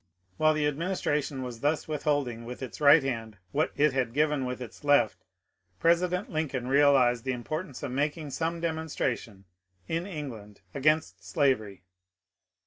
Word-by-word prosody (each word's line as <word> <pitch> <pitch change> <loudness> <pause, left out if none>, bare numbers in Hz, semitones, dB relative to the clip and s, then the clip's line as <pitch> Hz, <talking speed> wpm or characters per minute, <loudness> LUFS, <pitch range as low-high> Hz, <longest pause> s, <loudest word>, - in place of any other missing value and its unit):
While 155 0 +4
the 150 -1 +1
administration 150 -3 -1
was 120 -2 -6
thus 150 +4 0
withholding 145 -6 -1
with 125 +3 -7
its 125 +3 -8
right 145 +1 +7
hand 115 -5 -4
what 155 +2 +1
it 150 -1 +3
had 125 -2 -1
given 150 -2 +2
with 125 0 -4
its 125 +3 -9
left, 145 -6 +3 0.6
President 180 +3 +2
Lincoln 145 -6 -2
realized 135 -4 +4
the 130 - -1
importance 145 +4 -5
of 140 - -3
making 145 +2 -2
some 165 +3 -2
demonstration 155 - -3 0.4
in 165 +3 -2
England 115 - -7
against 155 +3 +1
slavery. 110 - 0
145 Hz, 140 wpm, -28 LUFS, 125-155 Hz, 0.6 s, right